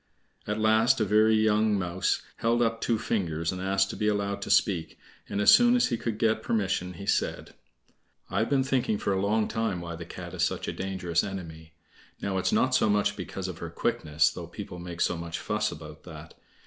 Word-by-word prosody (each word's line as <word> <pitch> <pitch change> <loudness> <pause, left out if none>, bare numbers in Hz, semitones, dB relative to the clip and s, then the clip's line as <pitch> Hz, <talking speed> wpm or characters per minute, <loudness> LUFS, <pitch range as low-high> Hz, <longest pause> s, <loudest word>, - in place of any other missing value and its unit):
At 105 0 -1
last 110 +2 +3
a 110 - +2
very 110 +2 +4
young 110 -1 +3
mouse 90 0 -1
held 120 +1 +2
up 115 0 -1
two 115 - +1
fingers 85 -7 -1
and 90 -1 -5
asked 95 +1 +1
to - - -7
be 105 - -1
allowed 100 -1 -1
to - - -5
speak, 90 -6 +2 0.3
and 100 - -2
as 105 - +7
soon 240 0 +6
as 245 - +3
he 120 - 0
could 115 -2 -3
get 110 0 +1
permission 95 -5 -1
he 100 +3 -9
said: - - -1 0.7
"I've 110 - -1
been 135 -2 +3
thinking 130 -5 0
for 100 - -1
a 95 - 0
long 105 +2 +1
time 110 -5 -1
why 85 -1 -6
the 85 +1 -8
Cat - - -9
is - - -4
such - - -1
a - - -2
dangerous 90 -3 -1
enemy. 80 -5 -7 0.5
Now, 95 -1 -1
it's - - 0
not 130 0 +2
so 110 - +3
much 105 -1 +2
because 95 0 -5
of 90 -3 -7
her - - -5
quickness, 75 +1 +1
though 85 -2 -8
people 90 0 -8
make 85 -1 -7
so 90 - +2
much 85 0 -5
fuss - - -1
about - - -10
that. - - -10
100 Hz, 210 wpm, -27 LUFS, 90-110 Hz, 0.7 s, as